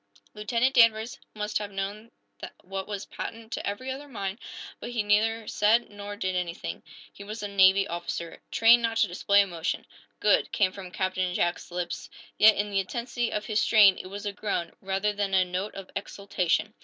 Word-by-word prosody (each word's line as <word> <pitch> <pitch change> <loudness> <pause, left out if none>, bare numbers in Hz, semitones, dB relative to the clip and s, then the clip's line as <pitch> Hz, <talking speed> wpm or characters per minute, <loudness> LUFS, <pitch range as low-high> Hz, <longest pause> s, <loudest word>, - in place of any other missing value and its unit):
Lieutenant 230 +5 0
Danvers 230 -2 +4 0.2
must 210 0 -1
have 205 -1 -5
known 200 +3 -5 0.5
what 190 +1 -5
was 205 -2 -5
patent 225 0 -7
to - - -3
every 230 +6 -3
other 280 +2 -7
mind 200 -5 -5 0.4
but - - -6
he 235 -3 -1
neither 220 +2 +2
said 220 +3 +2
nor 205 0 -7
did 185 -3 -2
anything. 170 - -4 0.3
He 200 - -10
was 210 +1 -7
a - - -1
Navy 195 0 +5
officer, 170 0 -5
trained 235 +1 +6
not 230 -1 -1
to 225 - +4
display 200 +3 +3
emotion. 175 -4 -2 0.3
"Good!" 210 -1 +3
came 190 -3 +2
from 190 -1 -9
Captain 185 0 -1
Jack's 175 0 -1
lips. 175 -2 -4 0.3
Yet, 215 0 +8
in 205 +1 -1
the 195 - +2
intensity 235 +4 -2
of 210 - -2
his 215 -2 +1
strain 205 -4 +6
it - - -7
was 200 +2 -7
a 205 - -2
groan, 200 -5 -2
rather 195 +2 0
than 200 -1 -1
a 185 -1 +4
note 185 +3 -4
of 195 -1 -9
exultation. 200 +1 -1
205 Hz, 185 wpm, -27 LUFS, 190-220 Hz, 0.5 s, Yet